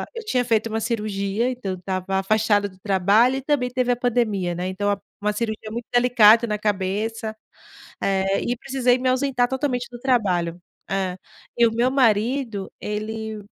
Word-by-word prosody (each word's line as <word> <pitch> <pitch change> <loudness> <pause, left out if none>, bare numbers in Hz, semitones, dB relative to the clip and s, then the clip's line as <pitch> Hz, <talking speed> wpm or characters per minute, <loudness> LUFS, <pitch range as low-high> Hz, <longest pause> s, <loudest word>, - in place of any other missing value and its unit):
eu 460 - -5
tinha 250 -12 +1
feito 225 -1 +1
uma 220 0 -2
cirurgia, 210 0 -1
então 240 -6 -4
eu - - -6
estava 190 +1 -2
afastada 205 +1 +2
do 185 - -19
trabalho, 205 +7 +3
e - - -4
também 270 -2 0
teve 250 0 0
a - - -2
pandemia, 220 -7 0
né, 180 +2 -3
então 205 +2 -1
a 200 - -1 0.2
uma 210 0 0
cirurgia 215 0 -4
muito 235 +1 -5
delicada 235 -2 +6
na 210 -1 -2
cabeça, 215 +2 -2 0.7
eh, 195 0 +1
e 240 - -1
precisei 255 -1 +1
me 255 0 +1
ausentar 255 -1 +1
totalmente 255 -2 -2
do 240 - -9
trabalho. 185 -10 0 0.3
É. 190 -2 -1 0.4
E 235 - +6
o - - -1
meu 240 +2 +2
marido, 230 -3 +1
ele 215 +1 -4
220 Hz, 175 wpm, -23 LUFS, 200-245 Hz, 0.7 s, delicada